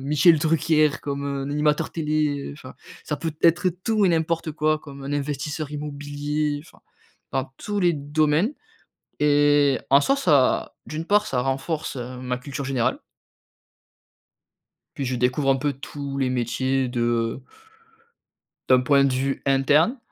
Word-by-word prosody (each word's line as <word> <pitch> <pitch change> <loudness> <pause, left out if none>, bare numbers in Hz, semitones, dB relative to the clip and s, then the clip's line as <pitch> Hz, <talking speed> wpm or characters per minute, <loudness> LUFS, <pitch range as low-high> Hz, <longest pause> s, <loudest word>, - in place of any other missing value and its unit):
Michel 150 +4 +4
Drucker, 155 -1 +3
comme, 140 0 -3
heu, 140 -1 -3
un 140 - -4
animateur 150 +2 +1
télé, 150 -2 -1
heu, - - -8
enfin, 135 -3 -12 0.3
ça 150 - -2
peut 160 +2 -4
être 175 +3 +4 0.2
tout 215 -2 +2
et - - +4
n'importe 165 -1 0
quoi 155 0 +1
comme 140 -2 -11
un 140 - -4
investisseur 145 +1 -3
immobilier, 145 0 -3
enfin, - - -20 0.5
dans 135 -1 0
tous 205 -1 -3
les 175 -1 +3
domaines. 155 - +1 0.7
Et 145 -2 +4
en 140 +1 +7
soit 275 - +2
ça 150 - +2
d'une 155 +2 -5
part 210 +2 +3
ça 125 -2 0
renforce, 135 +4 -2
heu, 125 +1 -6
ma 125 -1 -2
culture 140 +1 -6
générale 130 -3 0 2.0
puis 140 - -3
je 125 0 -2
découvre 125 +3 +1
un 135 - +4
peu 145 +1 -1
tous 140 +1 -7
les 130 -2 +1
métiers 130 +2 0
de 120 0 -1 1.3
d'un 130 -1 +6
point 140 +2 +4
de 135 - +2
vue 135 +1 -1
interne. 145 - +3
145 Hz, 150 wpm, -24 LUFS, 135-155 Hz, 2.0 s, en